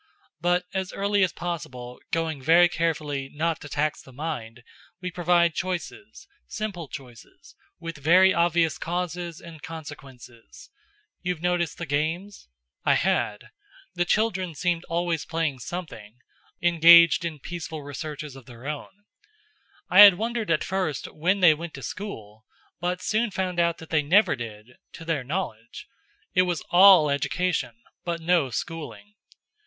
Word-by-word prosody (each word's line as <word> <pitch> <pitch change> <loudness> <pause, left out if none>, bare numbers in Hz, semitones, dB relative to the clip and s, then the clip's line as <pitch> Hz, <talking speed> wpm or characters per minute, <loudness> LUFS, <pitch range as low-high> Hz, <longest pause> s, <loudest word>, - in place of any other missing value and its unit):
But 175 +2 +1
as 190 0 -2
early 200 0 +1
as 185 - +1
possible, 130 -8 -6
going 160 -4 -2
very 170 +5 +6
carefully, 150 -5 -2
not 160 +1 -2
to 145 - -9
tax 150 +1 -1
the 130 - -16
mind, 125 -5 -6 0.4
we 180 0 -5
provide 170 -1 +2
choices, 185 - -5 0.2
simple 200 -7 -5
choices, 125 -5 -12 0.2
with 165 -3 -7
very 185 +6 +5
obvious 170 -1 +1
causes 175 0 -4
and 165 -3 -12
consequences. 135 -7 -11 0.5
You've 180 -2 -3
noticed 175 -2 0
the 170 - -5
games?" 160 - -3 0.3
I - - +4
had. 105 0 -1 0.4
The 175 -1 +1
children 190 -4 0
seemed 175 +2 -1
always 170 -1 -1
playing 160 -5 -2
something; 170 -2 -6
or - - -11
else, 110 +4 -23
sometimes, 175 0 +1
engaged 170 +1 +7
in 165 -2 -4
peaceful 160 0 -7
researches 145 0 -7
of 135 -3 -14
their 120 +1 -13
own. 150 +7 -7 0.8
I 185 - +4
had 205 -3 +11
wondered 225 +1 -3
at 165 -2 +2
first 185 -8 -3
when 185 +6 0
they 170 -4 +7
went 165 +1 -7
to 135 - -9
school, 110 - -8 0.3
but 180 +1 -2
soon 220 +2 +1
found 185 -3 -2
that 170 -1 0
they 155 -2 +3
never 185 +9 +4
did 115 0 -9 0.2
to 165 - -10
their 160 -5 -1
knowledge. 125 - -5 0.5
It 185 - +5
was 175 -3 -1
all 180 -5 +7
education 150 -2 -1 0.3
but 170 -1 -3
no 165 -4 +2
schooling. 165 - -6
165 Hz, 150 wpm, -25 LUFS, 145-180 Hz, 0.8 s, had